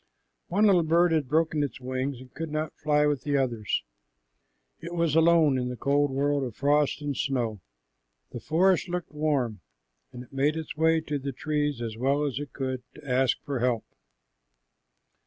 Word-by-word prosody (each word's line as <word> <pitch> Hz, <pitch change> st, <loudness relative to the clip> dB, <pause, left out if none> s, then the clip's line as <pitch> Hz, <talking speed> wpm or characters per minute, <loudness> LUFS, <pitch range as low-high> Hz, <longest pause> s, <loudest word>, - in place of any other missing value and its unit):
One 205 Hz, +5 st, +2 dB
little 190 Hz, -4 st, +5 dB
bird 170 Hz, +2 st, +3 dB
had 155 Hz, -4 st, +1 dB
broken 155 Hz, +1 st, +1 dB
its 145 Hz, -2 st, -3 dB
wing 130 Hz, +2 st, -3 dB
and 125 Hz, +1 st, -13 dB
could 165 Hz, 0 st, -5 dB
not 155 Hz, +1 st, -3 dB
fly 150 Hz, -1 st, +2 dB
with 145 Hz, -3 st, +1 dB
the 145 Hz, -1 st, 0 dB
others. 120 Hz, -, -1 dB, 1.0 s
It 170 Hz, +1 st, -7 dB
was 170 Hz, -3 st, +1 dB
alone 160 Hz, -4 st, +5 dB
in 125 Hz, 0 st, -2 dB
the 125 Hz, -, -4 dB
cold 145 Hz, +2 st, +2 dB
world 140 Hz, +1 st, 0 dB
of 120 Hz, -4 st, -5 dB
frost 145 Hz, +1 st, +1 dB
and 145 Hz, -1 st, -2 dB
snow. 120 Hz, -8 st, -1 dB, 0.7 s
The -, -, -6 dB
forest 180 Hz, +3 st, +2 dB
looked 175 Hz, -1 st, -4 dB
warm, 140 Hz, -, -1 dB, 0.5 s
and 125 Hz, -1 st, -8 dB
it 125 Hz, -, -20 dB
made 140 Hz, +3 st, +1 dB
its 160 Hz, -, -5 dB
way 160 Hz, +1 st, +3 dB
to 150 Hz, -2 st, -3 dB
the 140 Hz, +1 st, -4 dB
trees 145 Hz, -2 st, -2 dB
as 110 Hz, -1 st, -5 dB
well 140 Hz, +4 st, +1 dB
as 140 Hz, -2 st, -2 dB
it 145 Hz, -1 st, -6 dB
could, 130 Hz, -2 st, -3 dB
to -, -, -13 dB
ask 130 Hz, 0 st, +2 dB
for 140 Hz, -3 st, -3 dB
help. 120 Hz, -2 st, 0 dB
145 Hz, 180 wpm, -27 LUFS, 130-155 Hz, 1.0 s, little